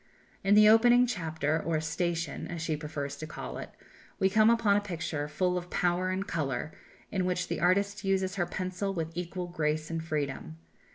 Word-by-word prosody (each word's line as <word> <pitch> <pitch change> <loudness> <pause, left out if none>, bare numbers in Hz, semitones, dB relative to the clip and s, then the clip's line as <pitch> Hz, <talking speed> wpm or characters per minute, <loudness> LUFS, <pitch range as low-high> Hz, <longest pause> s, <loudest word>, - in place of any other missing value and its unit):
In 195 +1 +4
the 210 0 +8
opening 240 +3 +6
chapter 160 -7 -1
or 160 0 0
"station," 165 0 -2
as 170 -2 -5
she 160 -2 0
prefers 150 -2 -5
to 155 - -6
call 155 - -6
it, - - -7 0.5
we 190 0 +2
come 215 +2 +5
upon 230 -3 +4
a 205 - +3
picture 160 -6 -3
full 180 +4 0
of 175 0 -11
power 180 +1 +1
and 190 +2 -2
colour, 150 -2 -2 0.4
in 190 -3 0
which 180 0 -1
the - - -2
artist 200 +4 +2
uses 190 -1 +1
her 175 -3 -1
pencil 185 +1 -3
with 165 -1 -3
equal 180 +1 -4
grace 155 -2 -2
and 165 -1 -2
freedom. 140 - -3
175 Hz, 185 wpm, -30 LUFS, 155-195 Hz, 0.5 s, the